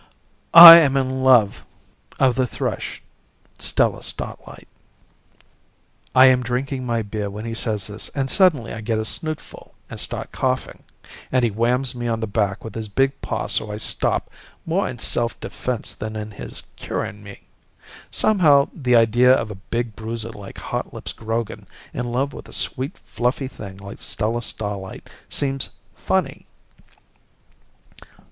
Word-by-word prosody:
"I 170 0 +14
am 140 -5 +3
in 130 0 -1
love 125 -6 +4 0.6
of 130 -2 +4
the 130 0 0
thrush, - - -4 0.6
Stella - - 0
Starlight." - - -7 1.5
I 130 +1 +8
am 130 -1 +5
drinking 130 +2 -3
my 115 -1 0
beer 105 0 -4
when 105 +3 -7
he 115 - -4
says 110 -3 -2
this, 105 +1 -5
and 135 -2 -1
suddenly 150 - +3
I 110 - -6
get 110 0 -1
a 110 - -2
snootful 155 +6 -5 0.2
and - - -7
start - - -3
coughing, 130 0 -2 0.5
and 125 -1 +2
he 115 - 0
whams 120 +4 0
me 120 -1 -4
on 115 -1 -1
the 110 - -2
back 100 -1 -1
with 110 - -8
his 110 -1 -5
big 135 +6 0
paw - - -3
so 105 - +1
I 105 - -5
stop, 110 - -1 0.3
more 175 +4 0
in 125 - -7
self 115 -1 -1
defense 125 -3 -4
than 110 0 -6
in 105 0 -6
his 100 - -7
curing 105 - -5
me. 100 -1 -12 0.7
Somehow, 155 -10 +3
the 125 -6 +1
idea 120 +2 +5
of 115 -4 +1
a 95 -2 -10
big 120 -2 -2
bruiser 115 0 -5
like 100 -3 -11
Hotlips - - -5
Grogan 115 0 -4 0.3
in 120 0 -4
love 135 +3 -1
of - - -10
a - - -12
sweet 135 +5 -2
fluffy 125 +4 -2
thing 100 -7 -10
like 100 0 -11
Stella 115 +2 -2
Starlight 105 -4 -5 0.2
seems 135 -2 -1 0.2
funny. - - -2
120 Hz, 155 wpm, -21 LUFS, 110-130 Hz, 1.5 s, I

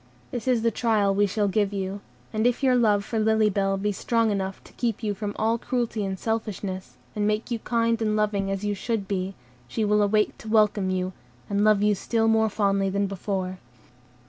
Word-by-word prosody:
This 240 0 -5
is 245 -3 +2
the 230 - +3
trial 215 -3 +2
we 205 +1 +3
shall 205 +1 0
give 200 0 +1
you; 195 0 -3 0.3
and 220 +2 +2
if 245 +2 0
your 260 -1 +4
love 210 -4 +3
for 225 - -2
Lily 220 -1 +3
Bell 195 0 +1
be 205 +2 0
strong 230 +2 +1
enough 195 -1 -3
to - - -17
keep 230 -2 -2
you 210 -1 0
from 205 0 -5
all 225 +2 +1
cruelty 235 -3 -1
and 190 -1 -3
selfishness, 200 -4 -4 0.2
and 210 -1 +1
make 215 +3 -1
you 235 - -1
kind 230 0 0
and 215 -1 +1
loving 205 -2 0
as 195 0 -2
you 205 - 0
should 205 0 -2
be, 190 -1 -2 0.3
she 215 - -1
will 210 0 +3
awake 210 +1 +2
to - - -11
welcome 210 -3 +3
you, 185 0 -1 0.4
and 200 +1 +2
love 210 -1 +4
you 210 0 +4
still 225 +3 0
more 220 0 +3
fondly 195 -2 +1
than 200 +1 0
before." 190 -1 -3
210 Hz, 210 wpm, -25 LUFS, 195-225 Hz, 0.4 s, your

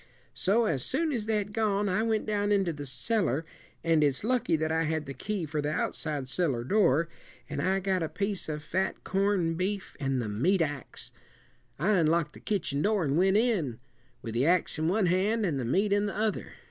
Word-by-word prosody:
So 225 +5 +2
as 140 -11 0
soon 315 +4 0
as 225 -6 -2
they'd 210 -2 0
gone, 210 -2 +1
I 185 +3 +1
went 220 -1 0
down 205 -1 0
into 195 -4 +2
the 145 -1 -7
cellar 160 - 0 0.4
and 165 -2 +3
it's 140 +1 +1
lucky 245 -6 +2
that 160 0 -1
I 160 0 +1
had 155 -1 -1
the 135 - -6
key 195 - -3
for 150 0 -2
the 145 +1 -1
outside 150 -3 -2
cellar 130 -5 -1
door 165 - +3 0.4
and 145 -2 -3
I 190 +4 +1
got 190 -1 0
a 160 - -1
piece 200 -2 -2
of 150 -1 -4
fat 190 +4 -2
corn 195 -3 +1
beef 190 +3 -3
and 135 -2 0
the 115 - -2
meat 165 - +2
ax. 145 -5 -6 0.7
I 175 +9 +1
unlocked 160 -1 +2
the - - -12
kitchen 160 -9 -1
door 205 -1 +2
and 140 -2 0
went 190 +4 +4
in, 200 - +1 0.5
with 115 - -5
the 120 +3 +1
ax 175 -2 +2
in 160 - +1
one 195 +3 +2
hand 200 +5 +2
and 150 -7 -1
the 125 - -2
meat 200 - +2
in 205 0 +2
the 200 - -4
other. 215 -1 -1
180 Hz, 210 wpm, -29 LUFS, 150-205 Hz, 0.7 s, went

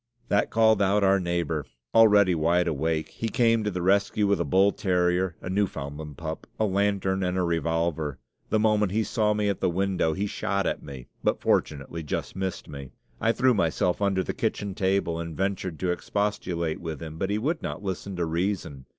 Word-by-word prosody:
That 100 - +2
called 110 -2 +4
out 100 +1 +3
our 95 0 +4
neighbor, 85 -4 -1 0.3
already 105 -4 +6
wide 85 +2 +2
awake; 80 +1 -1
he 115 - -4
came 115 -2 +3
to 105 - 0
the 90 -3 -3
rescue 100 +2 +2
with 100 0 +2
a - - +2
bull 95 +2 +4
terrier, 90 -2 +1
a - - -5
Newfoundland 75 -6 -3
pup, 80 -2 -6
a 110 - +3
lantern, 95 -1 +1
and 90 0 -1
a 90 - +1
revolver. 80 -3 -1 0.3
The 110 - +2
moment 105 -2 +2
he 110 +1 +2
saw 105 0 +1
me 105 -1 0
at 100 -2 -1
the - - +1
window 95 -2 0
he 100 +4 -2
shot 100 -1 -1
at - - -1
me, 65 -4 -9 0.2
but - - +1
fortunately 75 +3 0
just 75 - -4
missed 95 -1 -4
me. 70 -2 -9 0.3
I 115 - +3
threw 130 +2 +3
myself 90 -1 +1
under 95 -2 +2
the - - -3
kitchen 100 -1 -2
table 95 -3 0
and 85 -2 -6
ventured 95 -3 -2
to 90 -1 +1
expostulate 90 -4 -2
with 80 -4 -5
him, 80 -1 -8
but 95 - -1
he 105 - +1
would 155 +9 -1
not - - -5
listen 95 0 -4
to 85 -1 -1
reason. 80 -6 -2
95 Hz, 195 wpm, -26 LUFS, 80-100 Hz, 0.3 s, already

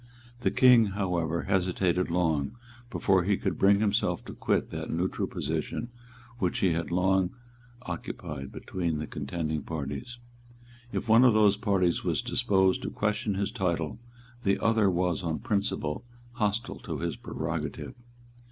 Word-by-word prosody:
The 120 - +2
King, 125 -3 +6
however, 85 -4 0
hesitated 90 -1 +1
long 85 +3 0 0.3
before 95 -6 +2
he 100 +2 +2
could 95 - -2
bring 100 +1 +5
himself 105 -1 +1
to - - -7
quit - - 0
that - - -5
neutral 95 +4 -1
position 80 - -3 0.5
which 90 -6 0
he 95 - +3
had 85 +1 -2
long 95 +2 +2 0.5
occupied 70 - -6
between 85 -4 -3
the 75 - -3
contending 75 +1 -3
parties. 75 - -5 0.7
If - - -3
one 115 +2 +7
of 120 -4 +6
those 105 -2 +5
parties 95 -5 +1
was - - 0
disposed 95 -2 +2
to - - -3
question 105 -1 -1
his 100 +1 -1
title, 85 -4 -1 0.4
the 100 -4 +2
other 110 -3 +3
was 90 0 0
on 80 -3 -1
principle 100 -6 -1 0.3
hostile 105 +1 -1
to - - -5
his 85 0 -2
prerogative. - - -4
95 Hz, 145 wpm, -28 LUFS, 85-105 Hz, 0.7 s, one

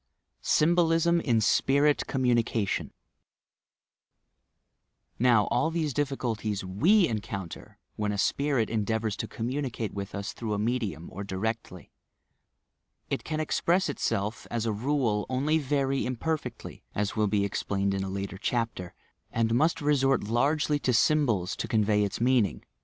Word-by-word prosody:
SYHBOUSM 170 +1 +3
IN 120 -7 +2
SPIRIT 140 +6 +3
COMMUNICATION 120 -5 0 2.3
Now, 120 -3 +5
all 140 +7 +2
these 160 -4 -1
difficulties 115 -8 -2
we 170 - +4
encounter 100 -5 -6 0.2
when 105 -1 -1
a 100 - -3
spirit 135 +1 +1
endeavours 110 -1 -1
to - - -3
communicate 120 -2 -3
with 100 0 -5
us 100 +2 -4
through 110 -3 -3
a - - -2
medium, 105 -7 -2
or 100 - -6
directly. 100 -1 -4 1.2
It - - -1
can 155 -1 -3
express 170 +3 +1
itself, 105 -6 -2
as 115 -1 -2
a 110 - 0
rule, 115 -2 0
only 145 +5 +1
very 135 -2 0
imperfectly 130 0 -4
(as 105 0 -1
will 105 -1 +2
be 100 0 +1
explained 100 0 -1
in 95 0 -1
a 95 - -4
later 95 0 -5
chapter), 115 -6 -2 0.4
and 115 0 +1
must 155 +7 +2
resort 135 -3 +2
largely 145 +7 +1
to 130 - 0
symbols 115 -9 +2
to - - -3
convey 105 -1 +2
its 100 - -3
mean 125 -2 +4
ing. - - -11
115 Hz, 135 wpm, -28 LUFS, 105-145 Hz, 2.3 s, Now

